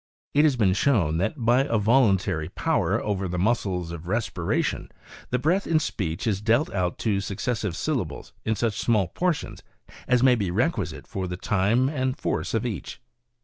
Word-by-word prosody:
It 150 +2 +5
has 145 -4 +3
been 100 -6 +3
shown 95 - +2
that 95 - 0
" - - -22
by 120 +3 +4
a 115 -5 +1
voluntary 100 -8 +2
power - - 0
over 100 -2 -1
the 90 0 -3
muscles 95 -4 0
of 85 0 -8
respiration 100 -4 -1 0.4
the 125 - +1
breath 170 +10 +1
in 165 - +3
speech 85 - -3
is 100 -4 0
dealt 115 +7 +2
out 90 -2 -1
to 100 -3 +1
suc 100 0 -5
cessive 110 -7 -2
syllables 105 - -3
in 110 - 0
such 110 -1 -1
small 105 -7 +2
portions 175 - -2 0.5
as 125 -1 +3
may 130 -1 +6
be 100 -6 0
requisite 120 - -1
for 95 -4 -4
the 90 0 -5
time 105 +6 +2
and 130 -2 -1
force'of 115 +1 -1
each. 100 - -5
110 Hz, 180 wpm, -25 LUFS, 95-125 Hz, 0.5 s, may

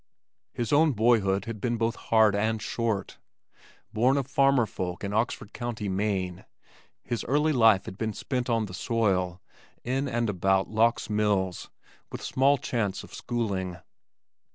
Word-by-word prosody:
His 120 0 -2
own 155 0 +4
boyhood 105 -4 +2
had 115 -3 -6
been 120 -1 0
both 115 +1 0
hard 110 -2 +3
and 110 +2 0
short. 110 -3 -3 0.7
Born 125 +5 +3
of 140 - 0
farmer 135 -2 +3
folk 90 -2 -5
in 100 0 -3
Oxford 110 -1 -1
County, 115 -3 -4
Maine, 95 -2 -2 0.6
his 120 - -3
early 150 +4 +2
life 110 -6 +5
had 95 - -9
been 110 -1 -2
spent 125 +3 -3
on 115 -2 +1
the 95 - -10
soil 95 -4 0 0.4
in 135 +3 -1
and 120 0 0
about 95 0 +1
Lock's 115 +2 +1
Mills 105 -4 0 0.4
with - - -7
small 140 +2 +3
chance 110 -6 -2
of - - -14
schooling. 95 -7 -3
110 Hz, 150 wpm, -27 LUFS, 95-120 Hz, 0.7 s, life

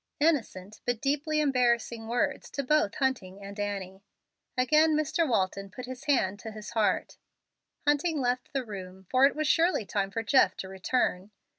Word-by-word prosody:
Innocent 225 - 0
but 245 -2 -1
deeply 295 +3 0
embarrassing 240 -4 +1
words 245 +4 -1
to 280 - -2
both 305 +4 +2
Hunting 200 -8 -2
and 200 +1 -8
Annie. 195 -2 -4 0.6
Again 305 +5 +4
Mr. 310 +1 +1
Walton 195 -2 0
put 245 +6 -8
his 255 +2 -8
hand 205 -9 +1
to 225 - -7
his 215 -1 -8
heart. 210 -4 0 0.7
Hunting 295 +2 +2
left 250 -1 -1
the 270 -2 -2
room, 190 -3 -8
for 260 +1 +6
it - - -4
was 310 0 -1
surely 330 - +3
time 195 -1 -1
for 225 +3 -3
Jeff 260 +3 +4
to 190 - -5
return. 190 0 -1
245 Hz, 165 wpm, -29 LUFS, 200-285 Hz, 0.7 s, for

